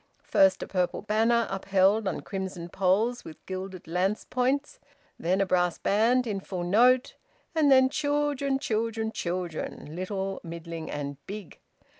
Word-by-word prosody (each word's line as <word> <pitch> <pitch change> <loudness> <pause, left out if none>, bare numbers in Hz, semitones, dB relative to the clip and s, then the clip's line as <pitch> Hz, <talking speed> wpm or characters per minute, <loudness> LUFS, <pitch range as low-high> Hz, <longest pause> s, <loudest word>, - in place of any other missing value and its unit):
First 190 -1 +3
a - - -7
purple 180 -1 -1
banner, 225 +2 +2
upheld 195 +2 +2
on 190 - -2
crimson 190 -3 -5
poles 200 +7 +1
with 155 - -12
gilded 185 -1 -6
lance 185 +5 0
points; 260 +3 -1 0.4
then 180 +3 +1
a 195 - +3
brass 180 -2 +1
band 235 +5 +2
in 205 -4 -2
full 185 -2 -5
note; 245 +8 +4 0.4
and 305 -3 +3
then 260 -1 +7
children, 290 -1 0
children, 225 -3 -1
children 170 -5 -4
little, 190 +1 -3
middling, 165 -1 -7
and 140 -1 -5
big. 205 -2 -8
195 Hz, 140 wpm, -27 LUFS, 180-235 Hz, 0.4 s, then